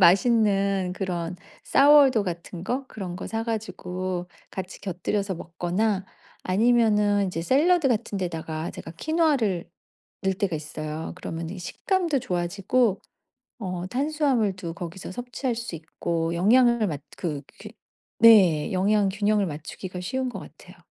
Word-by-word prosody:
맛있는 195 -1 +4
그런 180 -2 -3 0.3
Sour 285 -1 +7
dough 215 -4 +1
같은 170 0 -6
거 260 +4 -2
그런 180 -4 -6
거 - - -6
사가지고 185 -5 -3 0.2
같이 190 -1 -7
곁들여서 195 +1 -2
먹거나 185 +4 -1 0.4
아니면은 210 -1 +3
이제 165 -2 -3
샐러드 310 - +3
같은 215 -3 -1
데다가 160 -2 -3
제가 165 - -9
퀴노아를 265 - +1 0.5
넣을 190 0 +2
때가 180 -4 -1
있어요. 155 +1 -5
그러면 165 -2 -5
이 190 - -7
식감도 330 - -1
좋아지고 195 +5 0 0.6
어 180 -2 -4
탄수화물도 245 - 0
거기서 180 +1 -7
섭취할 245 +2 -3
수 235 -6 -5
있고 165 +1 -3
영양을 235 +4 +4
맞 150 -6 -3 0.2
그 150 -5 -3 0.2
규 - - -7 0.5
네. 190 -10 +6
영양 200 +2 +3
균형을 205 0 +1
맞추기가 165 +4 -6
쉬운 260 +8 -2
것 245 - -6
같아요. - - -14
195 Hz, 310 characters per minute, -25 LUFS, 175-230 Hz, 0.6 s, Sour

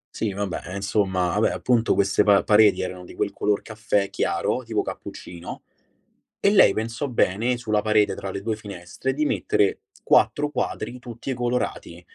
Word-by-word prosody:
Sì, 110 -3 -1
vabbè, 100 -2 -3
eh, 95 - -6
insomma, 95 -2 0
vabbè, 110 - +3
appunto 120 -3 +1
queste 100 +1 +2
pa 100 -1 +5
pareti 105 -2 +5
erano 90 -1 -5
di - - -12
quel - - -2
color 105 -1 0
caffè 105 -2 -1
chiaro, 100 +5 -1
tipo 115 -2 -1
cappuccino, 90 0 -8 0.8
e 200 - +3
lei 205 - +6
pensò 115 +5 -3
bene, 115 +2 +1
sulla 110 -3 0
parete 105 -1 +2
tra 95 -1 -5
le 95 - -5
2 110 +1 -2
finestre, 100 +3 -5
di 150 +2 0
mettere 100 -7 +1 0.2
4 150 0 +3
quadri 125 -3 -3
tutti 120 +2 -6
colorati. 120 -8 -3
105 Hz, 165 wpm, -24 LUFS, 100-120 Hz, 0.8 s, lei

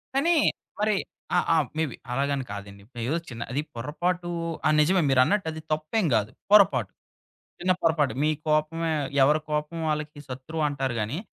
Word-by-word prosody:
కానీ 335 +6 +3 0.4
మరి 210 0 +2 0.4
ఆ! - - +5 0.2
ఆ! - - +4 0.2
మేబి 160 -6 -1 0.2
అలాగని 140 +1 0
కాదండి. 100 0 -9 0.3
ఏదో 160 - +1
చిన్న 120 -2 -8
అది 140 +4 0
పొరపాటు 175 +8 -2 0.4
ఆ! - - +4
నిజమే. 175 +5 +4
మీరన్నట్టు 145 +9 +3
అది 160 0 -7
తప్పేం 155 +7 0
కాదు. 105 0 0 0.2
పొరపాటు, 205 -2 +5 0.7
చిన్న 185 +1 +3
పొరపాటు. 155 -7 +2
మీ 155 - +3 0.2
కోపమే 155 +2 +1 0.3
ఎవరి 150 +3 +3
కోపం 150 +2 -2
వాళ్ళకి 150 -1 -3
శత్రువంటారు 135 0 -2
గానీ 110 +9 -2
150 Hz, 145 wpm, -26 LUFS, 135-165 Hz, 0.7 s, ఆ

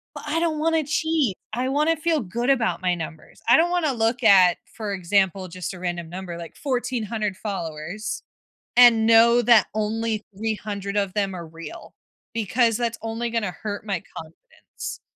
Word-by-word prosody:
But - - -8
I 310 +3 0
don't 325 -2 0
wanna 320 0 +1
cheat. 310 - 0 0.2
I 250 +3 -1
wanna 300 +4 +2
feel 320 0 +1
good 235 +5 -2
about 245 -8 +1
my 180 -1 +2
numbers, 165 -1 -8
I 240 - +8
don't 335 +2 +3
wanna 345 -5 +1
look 235 +1 0
at, 185 -5 +6 0.2
for 215 -3 -4
example, 190 0 +1
just 185 +1 -6
a - - -9
random 175 -2 -4
number, 180 0 -6
like 170 -1 -9
1400 230 -6 -2
followers, 190 +1 -5 0.5
and 235 -2 +7
know 230 +1 +6
that 235 -2 +6
only 220 0 -1
300 205 -2 -3
of 200 -2 0
them 200 -2 0
are 170 -2 -7
real, 165 +1 -10 0.4
because 230 +1 +2
that's 235 -1 -2
only 225 +1 -3
gonna 225 -4 -1
hurt 210 -1 -4
my 195 -5 -2
confidence. 160 0 -9
220 Hz, 165 wpm, -24 LUFS, 185-245 Hz, 0.5 s, I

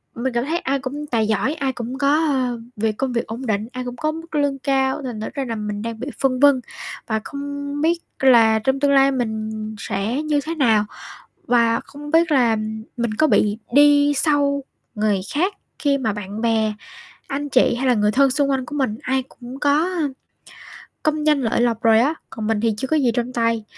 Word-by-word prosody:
Mình 250 +2 -2
cảm 235 +1 0
thấy 325 +4 -1
ai 275 -2 -1
cũng 275 +3 -5
tài 225 -5 0
giỏi, 220 +6 +1
ai 275 -4 -2
cũng 245 +1 -5
có, 280 0 +2 0.2
ơ, 255 -4 0 0.2
việc 215 0 -1
công 265 -2 -1
việc 235 - -1
ổn 235 +4 -6
định, 215 -1 -1
ai 255 0 -4
cũng 245 0 -5
có 310 0 0
mức 325 0 -8
lương 285 -2 0
cao, 265 0 0
thành 245 -4 -5
thử - - -3
ra 275 -2 -3
là 230 -2 -3
mình 210 -1 -4
đang 230 0 -5
bị 255 - -5
phân 255 -2 +1
vân 280 -2 +5 0.5
và 220 -1 -1
không 285 +1 -5
biết 335 +2 +2 0.2
là 230 -4 +5
trong 265 +5 0
tương 285 0 +2
lai 275 0 +5
mình 220 -4 -2 0.3
sẽ 210 +9 -2
như 300 -1 +1
thế 330 +1 -3
nào. 225 -8 +3 0.6
Và 235 -3 +3
không 295 +1 -10
biết 330 0 +3
là 240 -5 +3 0.4
mình 235 -3 -1
có 310 - +3
bị 210 -7 +2
đi 290 +1 +5
sau 280 -1 +1 0.3
người 210 -3 +1
khác 365 +7 +1 0.2
khi 280 -1 +1
mà 225 -5 -1
bạn 205 +1 -6
bè, 225 -2 +1 0.6
anh 285 +1 -3
chị, 255 -3 +3
hay 260 +2 -2
là 250 - +4
người 210 -1 +2
thân 275 +2 +4
xung 280 +1 +1
quanh 265 -2 0
của 295 - -6
mình, 255 -6 -1
ai 265 0 0
cũng 250 +2 -10
có, 290 +2 +3
a, 350 -5 -1 0.9
công 305 0 0
danh 300 -2 +4
lợi 225 -1 0
lộc 235 -2 +1
rồi 225 -1 +5
á, 285 +6 +2 0.2
còn 220 -1 -5
mình 220 -1 0
thì 225 -1 +1
chưa 260 +5 -4
có 315 - +2
gì 265 -5 +3
trong 245 +1 -2
tay, 230 -2 0
260 Hz, 215 wpm, -21 LUFS, 225-285 Hz, 0.9 s, vân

